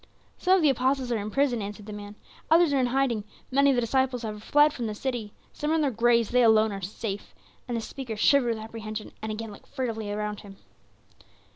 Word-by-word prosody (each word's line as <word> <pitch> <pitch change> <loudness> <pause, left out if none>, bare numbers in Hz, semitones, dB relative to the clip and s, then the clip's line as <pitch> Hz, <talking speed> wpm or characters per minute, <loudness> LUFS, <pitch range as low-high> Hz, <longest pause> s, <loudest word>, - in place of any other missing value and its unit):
"Some 370 +1 +4
of 370 - +2
the 295 - +6
apostles 260 0 0
are 230 - +1
in 205 +1 -4
prison," 255 -2 +1
answered 205 +1 -7
the 210 - -7
man; 205 0 -8 0.3
"others 325 -2 +5
are 275 - +3
in 255 - +2
hiding. 245 -4 +1 0.3
Many 280 +2 +4
of 270 - +4
the 245 - +2
disciples 250 0 0
are 210 -1 -5
fled 295 +7 +4
from 235 -3 -3
the 215 - -4
city. 235 -3 -3 0.2
Some 295 - -3
are - - +2
in 320 - +2
their 285 -3 +1
graves; 235 -1 +3
they 250 0 +3
alone 220 -2 +5
are 195 -1 -5
safe," 205 +2 -5 0.3
and 240 -1 -2
the - - -2
speaker 240 -1 -6
shivered 240 +1 +3
with 220 - -7
apprehension, 220 -1 -7
and 220 0 -3
again 220 0 -5
looked 205 - -14
furtively 230 -6 -3
about 210 0 -3
him. 200 -1 -12
230 Hz, 230 wpm, -27 LUFS, 215-265 Hz, 0.3 s, the